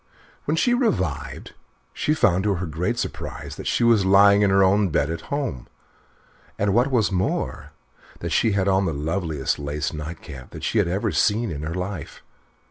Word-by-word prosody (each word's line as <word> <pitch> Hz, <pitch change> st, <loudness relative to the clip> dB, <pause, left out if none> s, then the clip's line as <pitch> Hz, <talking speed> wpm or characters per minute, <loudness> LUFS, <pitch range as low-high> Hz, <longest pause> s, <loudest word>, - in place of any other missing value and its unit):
When 155 Hz, +3 st, 0 dB
she 240 Hz, +8 st, +3 dB
revived 80 Hz, -, -1 dB, 0.4 s
she 155 Hz, -, 0 dB
found 95 Hz, -, +2 dB
to 100 Hz, -2 st, +2 dB
her 90 Hz, +1 st, -3 dB
great 90 Hz, +9 st, -2 dB
surprise -, -, -5 dB
that -, -, -7 dB
she -, -, +1 dB
was 115 Hz, -4 st, +5 dB
lying 100 Hz, +1 st, +6 dB
in 100 Hz, -, +4 dB
her 95 Hz, 0 st, +4 dB
own 100 Hz, +1 st, +3 dB
bed 75 Hz, 0 st, 0 dB
at 85 Hz, -1 st, -7 dB
home, 135 Hz, -, -3 dB, 0.9 s
and, 100 Hz, -1 st, +1 dB
what 120 Hz, +5 st, +3 dB
was 115 Hz, -6 st, +2 dB
more, 90 Hz, -5 st, -2 dB, 0.5 s
that -, -, -5 dB
she 110 Hz, -, +2 dB
had 100 Hz, -1 st, +1 dB
on 95 Hz, 0 st, +3 dB
the 80 Hz, -, -1 dB
loveliest 80 Hz, -2 st, -2 dB
lace 75 Hz, +2 st, -3 dB
night 80 Hz, +2 st, -7 dB
cap 65 Hz, -4 st, -10 dB
that -, -, -10 dB
she -, -, +1 dB
had -, -, +2 dB
ever 95 Hz, +4 st, -1 dB
seen 110 Hz, 0 st, +1 dB
in 75 Hz, -2 st, -5 dB
her 80 Hz, +3 st, -4 dB
life. 90 Hz, -3 st, -6 dB
95 Hz, 190 wpm, -23 LUFS, 80-105 Hz, 0.9 s, lying